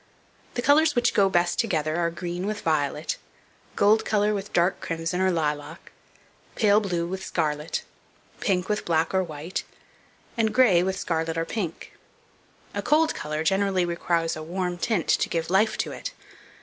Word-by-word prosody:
The 245 - -2
colours 300 +2 +4
which 240 0 +2
go 195 -1 +4
best 175 -1 +1
together 155 -7 0
are 170 -1 +1
green 175 +2 -4
with 210 0 -3
violet; 150 -1 0 0.6
gold 210 +2 +4
colour 210 0 +1
with 200 0 -4
dark 175 +2 +2
crimson 165 +2 -2
or 190 - +3
lilac; 150 -4 -3 0.6
pale 210 -2 +4
blue 175 -5 -1
with 190 +2 -5
scarlet; 150 -1 -2 0.6
pink 180 -2 0
with 210 0 -1
black 165 0 +1
or 190 0 +3
white; 160 +1 -5 0.7
and 225 -2 +1
gray 225 -9 +6
with 190 +1 -1
scarlet 165 -2 -2
or 165 - 0
pink. 175 -4 -5 0.8
A - - -2
cold 315 +1 +3
colour 155 +1 -3
generally 190 +1 +2
requires 170 -1 0
a 155 - -6
warm 175 +2 -3
tint 205 -3 0
to - - +2
give 165 0 -2
life 210 +3 +3
to - - -2
it. - - -6
180 Hz, 160 wpm, -25 LUFS, 165-205 Hz, 0.8 s, gray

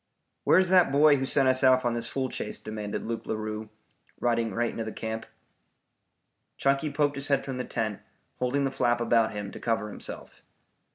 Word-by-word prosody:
"Where's 185 -1 +5
that 180 -4 +5
boy 145 +1 +6
who 135 0 -2
sent 135 -1 +4
us 130 +1 +3
off 130 -1 +5
on 120 - +1
this 115 -1 -1
fool 135 -1 -2
chase?" - - -4
demanded 105 -1 -5
Luke 115 0 -4
Larue, 110 0 -4 0.5
riding 115 -2 +1
right 120 +4 -1
into 115 - -4
the 110 - -5
camp. 110 0 -5 1.3
Chunky 140 +2 +1
poked 145 0 0
his 140 +1 0
head 140 -1 +1
from 130 -2 -4
the - - -1
tent, 110 -3 -3 0.4
holding 125 +3 0
the 135 - -1
flap 120 -2 +1
about 115 -2 +2
him 100 -1 -5
to - - -9
cover 115 -2 -1
himself. - - -7
120 Hz, 185 wpm, -27 LUFS, 110-135 Hz, 1.3 s, boy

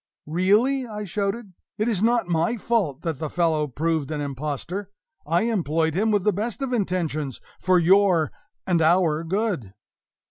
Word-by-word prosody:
"Really," 210 - +2
I 210 -1 -5
shouted, 200 +2 -3 0.2
"it 215 - 0
is 215 -6 0
not 235 -2 +2
my 170 +7 +1
fault 205 - -1
that 160 -5 -3
the 155 - -3
fellow 160 -3 +1
proved 155 +1 -1
an 155 -1 -3
impostor. 145 +7 -4 0.4
I 170 +5 +2
employed 165 -8 0
him 210 +6 +1
with 205 -3 +2
the 210 - +2
best 225 +7 -3
of 260 -2 -2
intentions, 165 - -1 0.2
for 185 -1 +3
your 180 -2 +4 0.3
and 175 -3 +2
our 165 -1 +3
good!" 175 - -2
180 Hz, 155 wpm, -24 LUFS, 160-210 Hz, 0.4 s, your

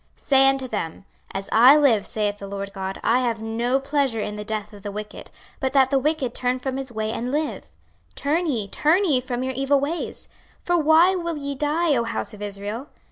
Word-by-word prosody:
26:033:011 - - -26
Say 270 -1 +6
unto 270 -1 -1
them, 195 -5 -5 0.3
As 195 0 -5
I 250 +6 +8
live, 250 -9 +3
saith 205 -1 -1
the 200 - -7
Lord 200 0 -6
GOD, 190 0 -5
I 240 +2 +3
have 230 -3 -1
no 235 +4 0
pleasure 275 -4 0
in 210 0 -3
the 210 - -5
death 210 0 -5
of 205 - -12
the 205 - -5
wicked; 210 +1 -8 0.3
but 265 -1 -1
that 265 -1 +4
the 275 - +3
wicked 285 -3 -1
turn 250 0 -1
from 260 +1 -4
his 270 -2 -4
way 220 -1 -2
and 245 +3 -3
live: 300 +1 -2 0.5
turn 320 +5 0
ye, 230 -9 -1
turn 325 - +2
ye 275 -8 +2
from 250 0 -3
your 260 0 -2
evil 275 +2 +2
ways; 305 +5 -4 0.4
for 350 - +1
why 325 +3 +5
will 340 -3 -3
ye 280 -1 -4
die, 300 +3 +1
O 235 - +1
house 230 0 -4
of 210 - -11
Israel? 205 +5 -5
255 Hz, 220 wpm, -23 LUFS, 215-285 Hz, 0.5 s, I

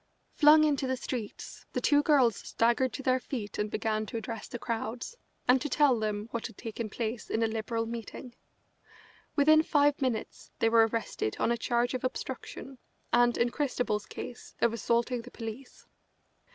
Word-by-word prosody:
Flung 305 0 +7
into 285 -3 +1
the 260 0 -1
streets, 240 -5 -6
the - - 0
two 290 0 +4
girls 270 -7 +4
staggered 235 +5 +1
to 270 - -5
their 255 0 +3
feet 235 -5 -5
and 210 0 0
began 215 0 -1
to 230 - -4
address 225 0 -5
the - - -6
crowds, 235 - -4 0.3
and 250 +1 +5
to 295 - -2
tell 270 -3 +4
them 210 0 -2
what 235 - -3
had 230 - -16
taken 225 0 -5
place 225 +1 -4
in 225 - +1
a - - +3
Liberal 225 +1 -2
meeting. 235 +2 -7 1.0
Within 310 +2 +6
five 290 -2 +2
minutes 250 -5 -2
they 225 - +3
were 225 0 +6
arrested 220 - -2
on - - +2
a - - +3
charge 240 +1 0
of 255 - -3
obstruction 260 +1 -5 0.3
and, 240 0 +4
in 235 0 +2
Christabel's 245 -7 -1
case, 245 - -8
of 235 -1 +3
assaulting 235 +1 0
the 245 - -12
police. 230 +2 -8
235 Hz, 175 wpm, -30 LUFS, 225-260 Hz, 1.0 s, Flung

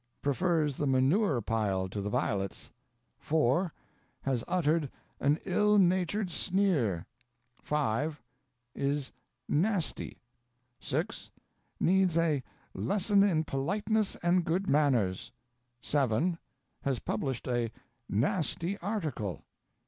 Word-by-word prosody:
Prefers 150 0 +1
the 145 - 0
manure 135 - +3
pile 100 -4 0
to 100 +2 -4
the 100 - -2
violets. 105 -6 -2 0.5
4. 160 +3 +2 0.5
Has 130 -4 0
uttered 165 -4 +1 0.3
"an 145 +2 +3
ill 210 +3 +3
natured 185 +1 +2
sneer." 165 - +1 0.6
5. 150 +1 -1 0.5
Is 140 0 -1 0.4
"nasty." 185 +3 0 0.6
6. - - -3 0.5
Needs 185 -2 +3
a 160 -5 +2 0.3
"lesson 200 0 +2
in 175 -6 +3
politeness 205 +10 0
and 175 +1 +3
good 180 +4 0
manners." 130 -11 +2 0.5
7. 145 +5 +1 0.4
Has 135 -2 0
published 125 +3 -3
a 120 -2 0 0.4
"nasty 170 - 0
article." 155 - -3
150 Hz, 95 wpm, -30 LUFS, 130-185 Hz, 0.6 s, manure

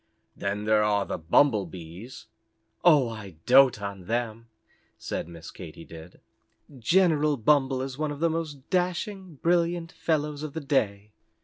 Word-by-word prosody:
"Then 100 +1 -3
there 110 0 +4
are 105 -2 +1
the - - -4
Bumble 100 - +3
Bees." 90 +8 -10 0.6
"Oh, 150 -7 +6
I 110 -6 -8
dote 130 -2 +6
on 100 -3 -6
them," 115 0 -2 0.5
said - - -4
Miss 85 -1 -10
Katy 85 -2 -10
Did. 80 +2 -12 0.6
"General 155 0 +3
Bumble 130 +1 +2
is 135 +1 -6
one 155 -1 0
of 145 - -7
the 170 - +3
most 160 -4 -4
dashing, 185 0 -2
brilliant 170 0 +1
fellows 150 -2 -1
of 155 -2 -6
the 160 - -3
day." 105 -8 -1
130 Hz, 145 wpm, -27 LUFS, 100-155 Hz, 0.6 s, Oh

